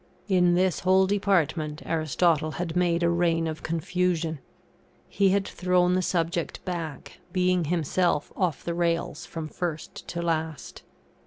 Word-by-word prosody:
In 180 Hz, -3 st, +4 dB
this 185 Hz, -1 st, +2 dB
whole 190 Hz, +1 st, +4 dB
department, 175 Hz, -6 st, 0 dB
Aristotle 155 Hz, 0 st, +1 dB
had 175 Hz, -1 st, -4 dB
made 175 Hz, -1 st, +2 dB
a 170 Hz, -, +4 dB
reign 170 Hz, -1 st, +1 dB
of 155 Hz, -1 st, -4 dB
confusion; 165 Hz, -1 st, -1 dB, 0.7 s
he 195 Hz, -1 st, +2 dB
had 195 Hz, 0 st, +1 dB
thrown 180 Hz, 0 st, +2 dB
the 185 Hz, -, +2 dB
subject 170 Hz, -2 st, -2 dB
back, 165 Hz, -5 st, -5 dB
being 180 Hz, -1 st, +2 dB
himself 170 Hz, 0 st, 0 dB
off 180 Hz, -7 st, -1 dB
the 170 Hz, -, -2 dB
rails 170 Hz, -1 st, -1 dB
from 160 Hz, -2 st, -5 dB
first 160 Hz, -1 st, -5 dB
to 170 Hz, 0 st, -4 dB
last. 160 Hz, -3 st, -3 dB
170 Hz, 140 wpm, -26 LUFS, 160-180 Hz, 0.7 s, In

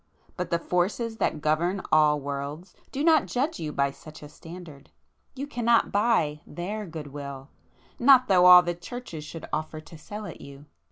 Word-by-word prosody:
But 180 Hz, -1 st, -4 dB
the 170 Hz, -, +1 dB
Forces 200 Hz, +7 st, -1 dB
that 155 Hz, -, -1 dB
govern 170 Hz, +5 st, +1 dB
all 150 Hz, -1 st, +4 dB
worlds, 145 Hz, +5 st, -6 dB, 0.2 s
do 280 Hz, -, -3 dB
not 320 Hz, -1 st, +4 dB
judge 280 Hz, +6 st, -2 dB
you 155 Hz, -2 st, -4 dB
by 140 Hz, -1 st, 0 dB
such 155 Hz, +2 st, -13 dB
a 145 Hz, -, -10 dB
standard,—you 165 Hz, -, -12 dB
cannot 235 Hz, -4 st, +1 dB
buy 200 Hz, -9 st, +1 dB
their 205 Hz, +4 st, -5 dB
good 155 Hz, -4 st, -8 dB
will, 140 Hz, -1 st, -8 dB, 0.5 s
not 255 Hz, 0 st, +6 dB
though 180 Hz, -3 st, +5 dB
all 180 Hz, 0 st, +10 dB
the 175 Hz, 0 st, -2 dB
Churches 175 Hz, -3 st, -8 dB
should 160 Hz, +1 st, -8 dB
offer 155 Hz, 0 st, -3 dB
to 155 Hz, +1 st, -13 dB
sell 210 Hz, +6 st, -8 dB
it -, -, -9 dB
you! 140 Hz, +1 st, -12 dB
170 Hz, 170 wpm, -26 LUFS, 150-215 Hz, 0.5 s, all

